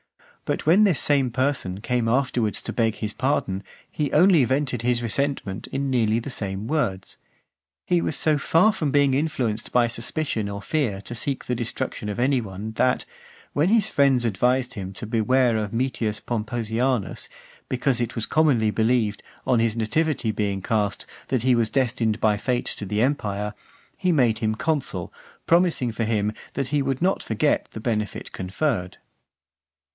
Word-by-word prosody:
But - - -2
when 180 +7 +6
this 190 -8 +3
same 140 -3 +2
person 125 -7 -1
came 120 +1 0
afterwards 120 -3 0
to - - -4
beg 115 -2 +1
his 105 -1 -4
pardon, 100 -8 -1 0.3
he 150 -2 -2
only 170 -2 +5
vented 130 -1 0
his 120 0 0
resentment 115 -5 -2
in 135 0 -2
nearly 115 -3 +2
the 120 +4 -4
same 100 -1 -4
words. 115 -11 -2 0.7
He 175 -1 +2
was 150 - +1
so 150 -1 +2
far 180 +9 +4
from 155 -8 -1
being 140 -1 +3
influenced 130 -7 -1
by 125 -1 +4
suspicion 115 -1 -2
or 100 0 -5
fear 120 -8 -1
to 120 - -6
seek 135 +3 -2
the 125 - -1
destruction 115 -3 -3
of 105 - -4
any 130 +1 +2
one, 105 +1 -6
that, 125 +3 +1 0.5
when 155 +5 +2
his 220 -1 +3
friends 135 -4 +3
advised 125 +4 +1
him 95 -5 -6
to 100 - -6
beware 120 +2 +2
of 105 -2 -2
Metius 115 -3 -1
Pomposianus, 120 0 -2 0.4
because 130 -1 0
it 120 -1 -2
was 115 - 0
commonly 135 -9 +3
believed, 110 -1 +1 0.2
on 125 -3 +3
his 115 0 +1
nativity 125 +1 0
being 100 -2 -2
cast, 105 -3 -1 0.2
that 130 -4 0
he 130 0 +4
was 115 -2 +2
destined 120 -4 0
by 110 -2 +3
fate 120 +4 -1
to 105 - -2
the 105 +4 +1
empire, 105 -6 -1 0.4
he 185 -2 +1
made 120 -8 +3
him 110 -1 0
consul, 140 - -2 0.3
promising 170 -8 +3
for 115 +1 -2
him, 105 -1 0 0.2
that 135 -2 -2
he 145 -1 +1
would 135 0 -1
not 190 +2 +2
forget 115 +7 0
the - - -7
benefit 105 -2 -3
conferred. 95 0 -2
120 Hz, 170 wpm, -24 LUFS, 110-140 Hz, 0.7 s, when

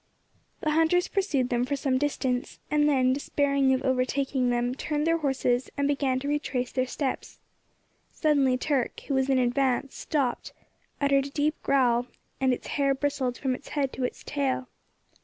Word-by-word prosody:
The 310 - 0
hunters 325 +3 +3
pursued 295 -11 0
them 240 -1 +1
for 275 +3 -1
some 265 -2 0
distance, 260 -3 -2
and 300 0 +3
then, 260 -2 +3
despairing 280 -1 +1
of 260 0 +1
overtaking 260 0 +1
them, 245 +1 0
turned 300 +2 -2
their 330 0 +2
horses, 260 -4 0
and 280 0 +1
began 275 -2 +1
to 280 - -4
retrace 275 -4 -1
their 255 0 0
steps. 265 +1 -4 0.7
Suddenly 280 -5 +2
Turk, 265 -2 -1
who 280 - -4
was 265 0 +1
in 265 - +3
advance, 255 +1 +1
stopped, 270 -6 -2 0.5
uttered 275 -1 +2
a - - -9
deep 300 +2 -1
growl, 245 -3 +2 0.3
and 265 -1 +2
its 250 - -3
hair 275 -1 +1
bristled 270 -3 -1
from 260 -2 -1
its 255 - -8
head 275 -3 -1
to 260 - -4
its 250 - -3
tail. 270 -3 -2
270 Hz, 170 wpm, -27 LUFS, 255-285 Hz, 0.7 s, hunters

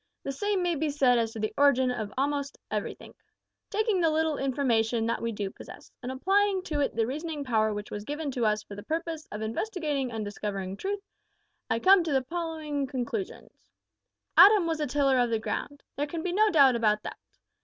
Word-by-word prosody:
The 275 - -3
same 395 +6 -1
may 350 -1 +1
be 310 0 -1
said 265 -4 +3
as 225 -1 0
to 225 - -6
the 215 0 -2
origin 260 -3 +4
of 215 -4 -4
a'most 280 +1 -1
everythink. - - -5 0.5
Taking 430 -3 +1
the 330 - +4
little 315 -1 0
information 240 -4 +1
that 230 - -1
we 230 - -1
do 205 -2 -4
possess, - - -12
and 255 0 -4
applying 385 +7 +2
to 300 -5 -2
it 285 - 0
the 225 -1 +2
reasoning 300 +3 -4
power 220 -4 +1
which 205 0 -6
was 205 - -5
given 295 +4 -4
to 245 -2 -2
us 215 -1 +1
for - - -11
the 205 - -7
purpose 320 - -4
of 210 - -5
investigatin' 290 - -2
an' 220 -2 -3
discoverin' 195 -2 -4
truth, 395 - -4 0.7
I 225 - +2
come 375 +8 +6
to 310 - -1
the 265 -1 +2
following 310 -2 -3
conclusions: 275 - -4 0.8
"Adam 410 -3 +8
was 325 -1 -1
a 300 - 0
tiller 275 -1 +2
of 245 -1 +2
the 225 - +1
ground. 285 +6 -4
There 290 +1 -1
can 325 +2 -5
be 360 - -2
no 430 +3 +4
doubt 275 -8 +6
about 215 -2 +2
that. - - -7
280 Hz, 205 wpm, -28 LUFS, 230-325 Hz, 0.8 s, Adam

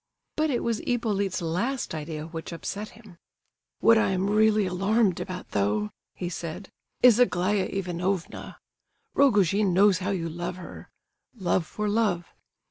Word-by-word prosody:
But 310 0 +1
it 245 -4 0
was 230 -2 0
Hippolyte's 205 -7 -1
last 205 +12 -2
idea 155 0 -5
which 165 0 -7
upset 200 +5 -5
him. 210 -6 -16 0.6
"What 230 -1 +6
I - - +2
am 190 +1 0
really 215 -1 +4
alarmed 195 +2 +1
about, 185 -1 -6
though," 105 +1 0 0.2
he 180 - -4
said, 175 +2 -6 0.3
"is 245 -2 +7
Aglaya 195 -4 +2
Ivanovna. 180 -1 -3 0.6
Rogojin 205 -7 +3
knows 195 -1 +5
how 190 +1 -2
you 180 -4 -1
love 175 +2 -4
her. 180 -2 -10 0.5
Love 180 -5 0
for 210 +3 -3
love. 205 -5 +1
190 Hz, 140 wpm, -26 LUFS, 175-215 Hz, 0.6 s, is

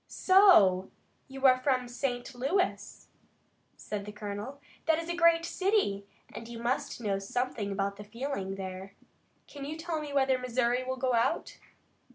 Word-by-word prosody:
"So 345 - +5 0.4
you 270 0 -5
are 255 -1 +6
from 255 -2 0
St. 245 +1 -3
Louis?" 290 +10 -2 0.7
said 205 -1 -5
the 210 - -7
colonel. 210 +6 -6 0.3
"That 320 -1 +4
is 330 0 -4
a 345 - -1
great 335 -1 +4
city, 370 - 0 0.3
and 230 - -8
you 235 0 -8
must 240 +1 -2
know 200 -3 -1
something 210 0 -3
about 200 0 -2
the 210 - -8
feeling 210 -3 -4
there. 190 0 -7 0.5
Can 285 -1 -10
you 300 +3 -5
tell 325 -1 -3
me 295 -1 -6
whether 265 -2 +2
Missouri 250 0 0
will 260 0 -3
go 255 0 0
out?" 230 0 0
250 Hz, 160 wpm, -30 LUFS, 205-285 Hz, 0.7 s, are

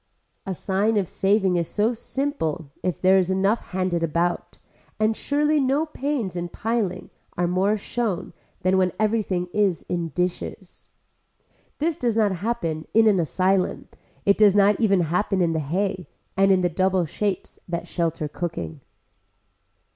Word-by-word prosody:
A 190 - -2
sign 205 +5 0
of 195 -3 +1
saving 195 -1 +2
is 170 -2 0
so 215 +3 +1
simple 220 - -3
if 180 -5 -2
there 190 +1 +5
is 185 -1 0
enough 195 +4 +2
handed 185 -2 -1
about, 170 +2 -1 0.4
and 215 +1 +2
surely 295 +4 +1
no 275 +3 +2
pains 275 - -3
in 175 0 -3
piling 205 -4 -2 0.3
are 175 0 +1
more 190 +4 +2
shown 205 -3 -3 0.3
than 190 +1 +3
when 185 -2 +2
everything 210 -5 0
is 200 -5 +1
in 170 -2 -2
dishes. 180 +3 -4 0.9
This 315 +1 0
does 235 -3 0
not 205 -4 +2
happen 170 -7 -2
in 225 0 +6
an 205 -4 +4
asylum, 185 +3 0 0.4
it 200 +1 +3
does 205 -2 +6
not 205 0 +4
even 200 -5 +4
happen 180 +4 0
in 170 -2 +2
the 160 - 0
hay 180 +5 -2 0.3
and 195 0 +4
in 190 -1 +4
the 180 - +3
double 185 +1 +1
shapes 195 +4 -3
that 170 -1 -3
shelter 165 -2 -1
cooking. 145 - -5
190 Hz, 155 wpm, -24 LUFS, 175-215 Hz, 0.9 s, in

